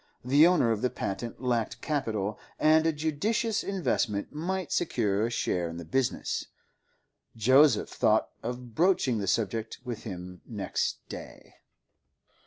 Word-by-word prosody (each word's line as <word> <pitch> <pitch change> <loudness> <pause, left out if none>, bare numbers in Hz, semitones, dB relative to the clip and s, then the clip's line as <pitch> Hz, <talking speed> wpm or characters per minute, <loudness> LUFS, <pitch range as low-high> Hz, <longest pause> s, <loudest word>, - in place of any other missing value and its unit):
The 145 +6 +6
owner 170 -10 +3
of 110 -2 -1
the 125 - +2
patent 115 +5 -5
lacked 120 -3 0
capital, 110 -9 -2 0.2
and 155 +1 +4
a - - +4
judicious 200 +9 0
investment 125 - -1
might 185 +5 -3
secure 105 - +1
a 115 - +1
share 90 -7 -1
in 85 - -7
the 85 - -7
business; 130 +9 -1 0.9
Joseph 130 +2 +5
thought - - +2
of 120 0 -6
broaching 165 - +2
the 100 - -3
subject 110 +2 -1
with 120 -3 -5
him 90 -3 -8
next - - -3
day. - - -10
125 Hz, 135 wpm, -28 LUFS, 105-155 Hz, 0.9 s, The